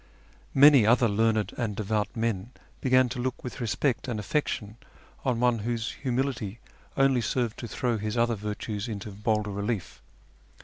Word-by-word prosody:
Many 140 -2 +8
other 120 +2 +4
learned 110 -1 +1
and 110 -4 -1
devout 105 0 -1
men 115 0 -2 0.3
began 130 -1 +4
to 125 +1 -5
look 125 0 -3
with 125 - -6
respect 120 +4 0
and 115 -4 -2
affection 110 -3 -2 0.5
on 125 -4 0
one 120 -1 +3
whose 115 +1 -2
humility 125 -5 -2 0.4
only 135 -2 +4
served 115 0 -1
to 120 - -5
throw 120 -1 -1
his 105 +2 -3
other 115 0 +3
virtues 105 0 -4
into 105 -2 -5
bolder 105 +1 -1
relief. 100 -1 -3
115 Hz, 150 wpm, -27 LUFS, 105-125 Hz, 0.5 s, Many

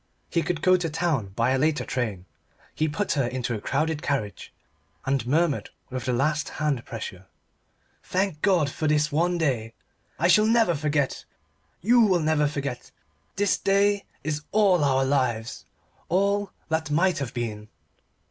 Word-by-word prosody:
He 170 - +2
could 165 -1 -3
go 185 0 +5
to 170 -2 -2
town 150 - 0
by 115 +3 +2
a 135 - +2
later 155 +1 +1
train. 105 -8 -3 0.5
He 155 - 0
put 165 +7 -2
her 135 -6 +1
into 125 -1 -3
a 105 - -4
crowded 155 +4 -1
carriage, 110 -8 -3 0.5
and 135 -3 0
murmured 155 +2 +1 0.2
with 130 0 -4
the 125 - 0
last 150 +5 0
hand 150 -6 0
pressure 95 -6 -7 0.7
"Thank 185 -4 -1
God 180 -7 +3
for 155 +3 -3
this 150 0 +2
one 175 +4 +1
day. 120 -8 -1 0.4
I 170 - +2
shall 215 +4 +5
never 225 -5 +4
forget. 145 -2 -1 0.6
You 240 +6 +4
will 190 -5 +4
never 155 -2 +2
forget. 140 -4 -4 0.5
This 200 0 +1
day 200 +1 +2 0.2
is 150 0 -2
all 195 -6 +4
our 135 -1 +2
lives 125 -5 -1 0.4
all 200 +2 +1 0.2
that 160 -1 -1
might 170 +3 +2
have 135 -3 -5
been." 110 -3 -4
150 Hz, 155 wpm, -25 LUFS, 130-175 Hz, 0.7 s, go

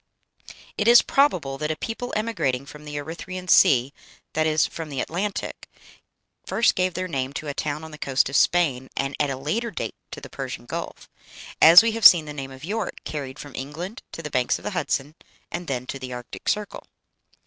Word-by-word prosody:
It 210 - +1
is 235 0 +8
probable 170 - +1
that 150 - -2
a 155 - -1
people 235 +8 -5
emigrating 200 - -1
from 150 +1 -12
the 150 0 -7
Erythræan 170 +5 -6
Sea, 135 -5 +5 0.4
that 155 0 +1
is, 155 0 +3
from 165 -2 -6
the 140 -3 -4
Atlantic, 195 +9 -3 0.7
first 230 - +2
gave 185 -1 0
their 185 0 -2
name 135 -4 -3
to 150 - -5
a 145 - -3
town 150 +2 -3
on 160 - -9
the 150 - -11
coast 135 -1 +2
of 140 - -5
Spain, 135 -6 +2
and 135 0 -1
at 145 - +1
a 135 - -3
later 215 - -2
date - - -4 0.2
to - - -8
the - - -10
Persian - - -6
Gulf - - -6 0.5
as 170 +6 +10
we 230 - +2
have 225 0 -5
seen 165 -3 +5
the 150 - -7
name 135 -2 -6
of 135 +2 -10
York 210 +1 -3
carried 140 -3 -5
from 145 -1 -10
England 165 - -6
to 165 - -7
the 150 - -6
banks 125 -2 +1
of - - -15
the - - -3
Hudson, 140 +3 -2 0.4
and 175 0 -5
then 125 -2 -3
to 135 - -6
the 130 -1 -6
Arctic 125 -1 -6
Circle. 210 -1 -3
150 Hz, 205 wpm, -24 LUFS, 135-185 Hz, 0.7 s, as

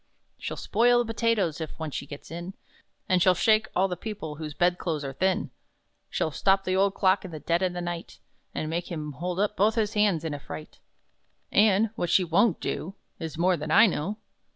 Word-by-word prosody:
"She'll - - -5
spoil 240 +2 +3
the 225 -1 -5
potatoes 210 -9 +1
(if 160 - -6
once 160 -3 -5
she - - -4
gets 145 +1 -10
in), 175 +3 -6 0.5
And 185 -1 +3
she'll 185 +1 +5
shake 220 +4 +3
all 190 +2 +3
the 180 - -3
people 175 -6 -6
whose 155 -2 -6
bed 175 0 +2
clothes 155 -4 -2
are 135 - -4
thin! 185 +6 0 0.6
She'll 155 - -1
stop 195 +5 +2
the 185 -1 0
old 195 +1 +2
clock 190 0 +3
in 185 - -7
the 155 -2 -7
dead 170 +4 0
o' 185 - +2
the 175 0 -5
night, 175 -1 -5 0.4
And 155 - -2
make 170 +3 -3
him 155 -3 -4
hold 175 +6 -4
up 210 +1 +1
both 210 +3 +3
his 215 -2 0
hands 205 -6 +2
in 160 - -2
a 145 - -5
fright; 80 - -9 0.7
And 210 +1 +4
what 175 - -2
she 185 - +4
won't 180 +3 +2
do, 190 +5 -4 0.2
Is 160 -1 -5
more 180 +2 +3
than 155 -1 -5
I 215 +8 +7
know! 195 +1 -1
180 Hz, 215 wpm, -27 LUFS, 160-200 Hz, 0.7 s, I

